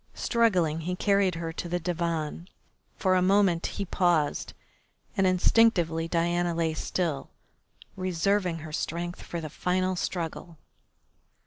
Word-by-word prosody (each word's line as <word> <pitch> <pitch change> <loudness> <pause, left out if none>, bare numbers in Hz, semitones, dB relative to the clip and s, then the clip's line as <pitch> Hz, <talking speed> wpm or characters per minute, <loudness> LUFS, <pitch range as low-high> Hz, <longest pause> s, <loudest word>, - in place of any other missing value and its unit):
Struggling 185 -10 +2
he 180 +3 -3
carried 195 -2 +2
her 165 -1 -4
to 175 - -5
the 175 +1 0
divan. 170 -1 -2 0.5
For 185 - +2
a 185 - +3
moment 185 -2 +3
he 200 - -4
paused, 175 -5 +1 0.6
and 195 -3 +3
instinctively 180 -4 +3
Diana 175 0 0
lay 165 -1 0
still, 160 -3 -2 0.7
reserving 185 0 0
her 155 - -9
strength 175 +3 -3
for 170 - -5
the 160 - -5
final 185 +4 0
struggle. 170 -1 -4
175 Hz, 125 wpm, -27 LUFS, 165-185 Hz, 0.7 s, a